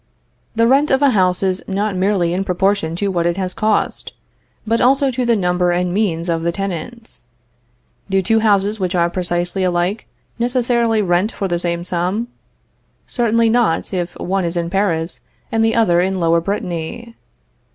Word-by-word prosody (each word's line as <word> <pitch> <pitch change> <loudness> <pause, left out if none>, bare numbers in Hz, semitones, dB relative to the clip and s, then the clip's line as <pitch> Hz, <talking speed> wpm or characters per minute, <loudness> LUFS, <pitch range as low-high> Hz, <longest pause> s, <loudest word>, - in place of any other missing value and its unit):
The 230 0 +3
rent 275 +5 +3
of 265 +1 +2
a 280 - +5
house 185 -4 +1
is 190 -1 0
not 200 +1 -1
merely 185 -2 +1
in 190 +2 -1
proportion 190 -2 0
to 200 +3 -1
what 170 -2 0
it 175 +1 -1
has 185 -1 -2
cost, 215 -1 -1 0.5
but 230 +1 +1
also 270 +2 +3
to 250 0 -2
the 235 - +4
number 180 -2 +1
and 175 0 0
means 180 -5 0
of 165 -1 0
the 170 +1 0
tenants. 195 - -4 0.8
Do 195 0 +1
two 225 +4 +3
houses 210 -1 +2
which 185 -1 -1
are 170 -1 +2
precisely 175 +1 -1
alike 180 +4 -1 0.3
necessarily 235 -2 +1
rent 180 +4 +1
for 195 - -3
the 175 -2 -1
same 170 0 -2
sum? 185 +7 -2 0.8
Certainly 230 -1 +1
not, 225 -8 +1
if 175 -1 -3
one 190 +1 -1
is 170 0 -2
in 170 0 -2
Paris 175 -4 -1 0.3
and 225 0 +2
the 225 0 +2
other 175 -7 +3
in 190 +1 -1
Lower 170 0 +2
Brittany. 195 +4 -4
190 Hz, 170 wpm, -18 LUFS, 175-225 Hz, 0.8 s, a